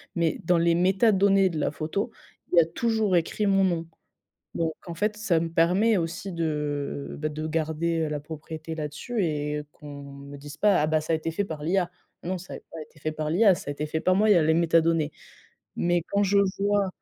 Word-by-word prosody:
mais 170 Hz, -3 st, 0 dB
dans 175 Hz, +1 st, +4 dB
les 170 Hz, 0 st, +3 dB
métadonnées 195 Hz, +1 st, +4 dB
de 160 Hz, -3 st, -4 dB
la -, -, 0 dB
photo, 165 Hz, +10 st, -3 dB, 0.4 s
il 180 Hz, -, +2 dB
y 170 Hz, -, +10 dB
a -, -, +2 dB
toujours 220 Hz, +2 st, 0 dB
écrit 170 Hz, +5 st, -1 dB
mon 195 Hz, 0 st, +4 dB
nom. 165 Hz, -3 st, -1 dB, 0.7 s
Donc 165 Hz, -1 st, 0 dB
en 170 Hz, -, -5 dB
fait 210 Hz, +4 st, -1 dB
ça 185 Hz, -6 st, +1 dB
me 165 Hz, 0 st, -2 dB
permet 185 Hz, +6 st, +3 dB
aussi 175 Hz, +4 st, -4 dB
de, 150 Hz, -4 st, -3 dB
bah 155 Hz, -, -1 dB
de 155 Hz, +1 st, -5 dB
garder, 160 Hz, +1 st, -1 dB
heu, -, -, -2 dB
la 150 Hz, -1 st, -3 dB
propriété 160 Hz, +1 st, -7 dB
là-dessus 160 Hz, +9 st, -3 dB
et 150 Hz, -2 st, -1 dB
qu'on 145 Hz, -1 st, -10 dB
me 140 Hz, 0 st, -10 dB
dise 145 Hz, +2 st, -10 dB
pas: 210 Hz, -1 st, +4 dB
«Ah 150 Hz, -, +2 dB
bah, 155 Hz, 0 st, +2 dB
ça 155 Hz, -, -2 dB
a -, -, +3 dB
été 160 Hz, +1 st, -3 dB
fait 200 Hz, +5 st, -1 dB
par 160 Hz, -6 st, -6 dB
l'IA». 175 Hz, +2 st, +1 dB, 0.3 s
Non, 185 Hz, +2 st, -3 dB
ça 180 Hz, -, -9 dB
a -, -, -5 dB
pas 165 Hz, -, -8 dB
été 155 Hz, +1 st, -16 dB
fait 155 Hz, +1 st, -3 dB
par 155 Hz, 0 st, -3 dB
l'IA, 195 Hz, +3 st, +5 dB
ça 170 Hz, -, -8 dB
a 145 Hz, -, -1 dB
été 150 Hz, +2 st, -4 dB
fait 160 Hz, +1 st, -2 dB
par 185 Hz, +2 st, +3 dB
moi, 210 Hz, +3 st, +3 dB
il -, -, +9 dB
y 195 Hz, -, +5 dB
a 170 Hz, -, +5 dB
les 160 Hz, +1 st, +3 dB
métadonnées. 165 Hz, -2 st, +2 dB, 0.6 s
Mais 175 Hz, 0 st, +1 dB
quand 200 Hz, 0 st, +1 dB
je 200 Hz, 0 st, +3 dB, 0.2 s
vois 200 Hz, 0 st, +2 dB
165 Hz, 230 wpm, -26 LUFS, 155-190 Hz, 0.7 s, y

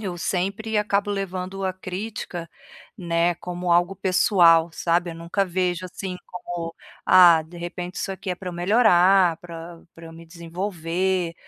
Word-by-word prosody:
eu 190 Hz, -5 st, -4 dB
sempre 200 Hz, +5 st, -2 dB
acabo 205 Hz, 0 st, 0 dB
levando 195 Hz, -1 st, -4 dB
a 185 Hz, -1 st, -1 dB
crítica, 185 Hz, -2 st, -6 dB, 0.5 s
né, 170 Hz, -2 st, 0 dB
como 180 Hz, +1 st, -5 dB
algo 175 Hz, +2 st, +3 dB
pessoal, 175 Hz, -3 st, +4 dB
sabe, 170 Hz, +2 st, 0 dB
eu -, -, -8 dB
nunca 170 Hz, +4 st, -1 dB
vejo, 180 Hz, -1 st, -1 dB
assim, 185 Hz, 0 st, -6 dB
como: 170 Hz, -2 st, -6 dB, 0.3 s
"Ah, 170 Hz, -3 st, +7 dB
de 175 Hz, +1 st, -12 dB
repente 175 Hz, +1 st, -6 dB
isso -, -, -3 dB
aqui 190 Hz, 0 st, -5 dB
é 180 Hz, -, -1 dB
para 185 Hz, 0 st, -8 dB
eu -, -, -5 dB
melhorar, 185 Hz, -2 st, +4 dB
para 170 Hz, 0 st, -10 dB
para 165 Hz, 0 st, -12 dB
eu 165 Hz, -, -11 dB
me 165 Hz, +1 st, -12 dB
desenvolver", 170 Hz, +1 st, -3 dB
180 Hz, 155 wpm, -23 LUFS, 170-190 Hz, 0.5 s, Ah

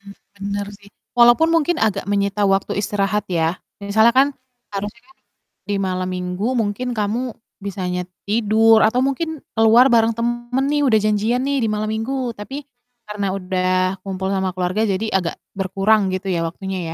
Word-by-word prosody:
Hmm, 200 Hz, 0 st, -13 dB, 0.2 s
bener 200 Hz, 0 st, -3 dB
sih. 200 Hz, 0 st, -18 dB, 0.3 s
Walaupun 240 Hz, +7 st, +6 dB
mungkin 330 Hz, +1 st, +2 dB
agak 210 Hz, -6 st, 0 dB
menyita 200 Hz, 0 st, +1 dB
waktu 195 Hz, 0 st, +1 dB
istirahat 205 Hz, 0 st, -1 dB
ya 165 Hz, 0 st, 0 dB, 0.2 s
misalnya 220 Hz, +3 st, +3 dB
kan 270 Hz, +1 st, +6 dB, 0.5 s
harusnya 205 Hz, +3 st, -5 dB
kan 355 Hz, -, -23 dB, 0.5 s
di 205 Hz, -, 0 dB
malam 185 Hz, -1 st, -2 dB
minggu 180 Hz, +2 st, -3 dB, 0.2 s
mungkin 215 Hz, +4 st, -2 dB
kamu 210 Hz, +4 st, 0 dB, 0.4 s
bisanya 180 Hz, -2 st, -3 dB
t -, -, -24 dB, 0.2 s
tidur 220 Hz, +1 st, +4 dB
atau 230 Hz, +3 st, +3 dB
mungkin 285 Hz, +3 st, -1 dB, 0.2 s
keluar 225 Hz, +4 st, +6 dB
bareng 225 Hz, 0 st, +4 dB
temen 240 Hz, +2 st, -1 dB
nih 295 Hz, -, +2 dB
udah 220 Hz, -5 st, +4 dB
janjian 215 Hz, +4 st, +1 dB
nih 280 Hz, 0 st, 0 dB
di 220 Hz, -, +1 dB
malam 215 Hz, 0 st, -2 dB
minggu 220 Hz, +4 st, -2 dB, 0.2 s
tapi 270 Hz, +8 st, -7 dB, 0.4 s
karena 205 Hz, -1 st, -3 dB
udah 185 Hz, 0 st, 0 dB
kumpul 190 Hz, -1 st, -3 dB
sama 190 Hz, -1 st, -1 dB
keluarga 185 Hz, +4 st, -1 dB
jadi 210 Hz, +4 st, -1 dB
agak 180 Hz, -3 st, 0 dB, 0.2 s
berkurang 195 Hz, +2 st, +1 dB
gitu 190 Hz, +1 st, -4 dB
ya, 170 Hz, -, 0 dB
waktunya, 190 Hz, +3 st, -5 dB
205 Hz, 165 wpm, -20 LUFS, 190-230 Hz, 0.5 s, Walaupun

